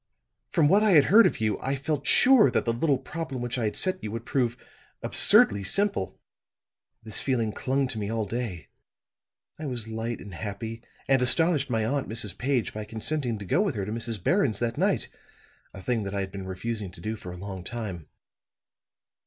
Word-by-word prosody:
From 155 - +3
what 200 +7 +5
I 215 -3 +4
had 150 -4 +7
heard 230 +2 +8
of - - -3
you, 110 -2 0
I 135 +2 -2
felt 140 0 -3
sure 255 -4 +6
that - - 0
the 115 - +1
little 140 +3 +1
problem 160 -4 -6
which 120 +1 -3
I 115 - 0
had 105 - -2
set 185 0 -1
you 105 - -3
would 115 +1 -6
prove 125 -3 0 0.5
absurdly 100 -1 +5
simple. 195 - -1 0.8
This 110 -2 +2
feeling 120 -5 0
clung 135 +5 -1
to 115 -5 -2
me 100 -1 -3
all 110 -1 -1
day; 105 -6 -5 0.9
I 155 - -4
was 120 -4 -2
light 110 +1 -4
and 100 - -10
happy, 110 +4 -6 0.3
and 135 -1 +3
astonished 145 +2 +3
my 110 -3 0
aunt, 140 +4 -1
Mrs. 105 -4 -1
Page, 125 +1 -1
by 110 - -5
consenting 115 +3 -2
to 100 - -8
go 170 - +2
with 200 - -1
her 100 -2 -2
to 105 - -5
Mrs. 115 -4 -3
Barron's 140 - +2
that 115 +1 -2
night, - - +1 0.6
a 95 - -11
thing 120 -3 0
that 100 0 -5
I 100 - 0
had 95 0 -5
been 95 -1 -7
refusing 105 +2 -4
to 90 - -14
do 110 +6 -4
for 90 - -10
a 90 - -8
long 95 -1 -7
time. 100 -8 -6
115 Hz, 200 wpm, -26 LUFS, 105-135 Hz, 0.9 s, heard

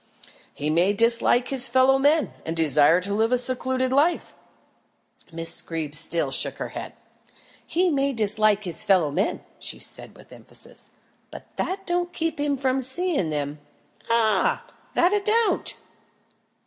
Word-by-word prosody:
"He 150 +1 -3
may 175 +5 +2
dislike 235 +3 +2
his 270 -2 +1
fellow 260 +2 +3
men, 295 +3 +2
and 165 +1 -5
desire 155 +1 +4
to 200 +2 -3
live 220 +3 +1
a 250 - +3
secluded 255 +1 0
life." 310 +6 +1 1.0
Miss 165 0 +1
Greeb 160 -3 -5
still 155 -2 +2
shook - - +1
her - - -5
head. - - -8 0.7
"He 360 +1 +1
may 280 -1 0
dislike 215 -2 +2
his 175 -4 -2
fellow 180 -7 +2
men," 190 +8 -2 0.2
she - - -5
said - - -4
with - - -16
emphasis, - - -4 0.4
"but - - -13
that 390 +1 -3
don't 350 0 -2
keep 325 -2 -3
him 290 -1 0
from 265 0 0
seeing 270 - +1
them 145 -1 -4 0.5
ah! 220 -4 +1 0.3
that 355 +3 +3
it 410 -1 0
don't." 450 +1 +1
235 Hz, 150 wpm, -24 LUFS, 170-285 Hz, 1.0 s, desire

